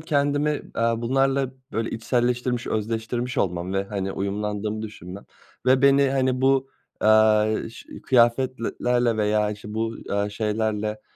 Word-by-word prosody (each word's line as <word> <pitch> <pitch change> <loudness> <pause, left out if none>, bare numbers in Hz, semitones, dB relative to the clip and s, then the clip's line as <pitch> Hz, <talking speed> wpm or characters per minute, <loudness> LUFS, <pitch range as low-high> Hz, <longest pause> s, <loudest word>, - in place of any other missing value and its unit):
kendimi, 145 -1 0
aaa, 115 0 0
bunlarla 135 +2 +1 0.2
böyle 115 0 -2
içselleştirmiş, 125 +1 -1
özdeştirmiş 115 +3 -2
olmam 90 0 -1
ve, 95 0 0
hani, 100 -1 -3
uyumlandığımı 105 +2 -3
düşünmem. 100 -3 -9 0.4
Ve 130 +1 +4
beni, 140 0 +5
hani, 130 -1 +1
bu, 135 0 +2 0.3
aaa, 110 0 +5 0.2
ş - - -13 0.2
kıyafetlerle 120 -1 +2
veya 105 0 +1
işte 105 0 -8
bu, 115 +1 -2
aaa, 100 0 0
şeylerle, 105 0 -2
115 Hz, 125 wpm, -24 LUFS, 105-130 Hz, 0.4 s, beni